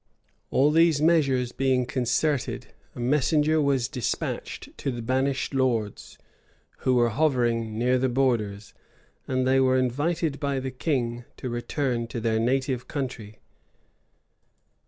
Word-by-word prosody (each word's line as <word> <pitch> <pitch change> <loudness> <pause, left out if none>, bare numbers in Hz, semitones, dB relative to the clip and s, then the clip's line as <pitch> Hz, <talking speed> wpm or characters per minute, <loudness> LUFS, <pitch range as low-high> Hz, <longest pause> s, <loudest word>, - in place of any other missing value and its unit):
[] - - -41
All 145 +3 +3
these 165 -1 +4
measures 140 -6 +2
being 130 -1 +1
concerted, 130 +3 -1 0.2
a - - -9
messenger 150 +4 +2
was 135 -4 +1
despatched 125 -4 -4
to - - -2
the 120 -3 -4
banished 130 +3 0
lords, 120 -6 -1 0.6
who 130 - +1
were 120 -1 +3
hovering 115 -4 0
near 125 +2 +2
the 130 +1 +1
borders; 115 -6 -1 0.5
and 130 0 0
they 135 0 +4
were 130 0 +3
invited 145 +4 0
by 140 -2 -1
the 130 0 -4
king 120 -4 -2
to 130 - -5
return 120 0 -2
to 120 0 -5
their 110 -1 0
native 130 +1 0
country. 125 -7 -5
130 Hz, 135 wpm, -26 LUFS, 120-140 Hz, 0.6 s, these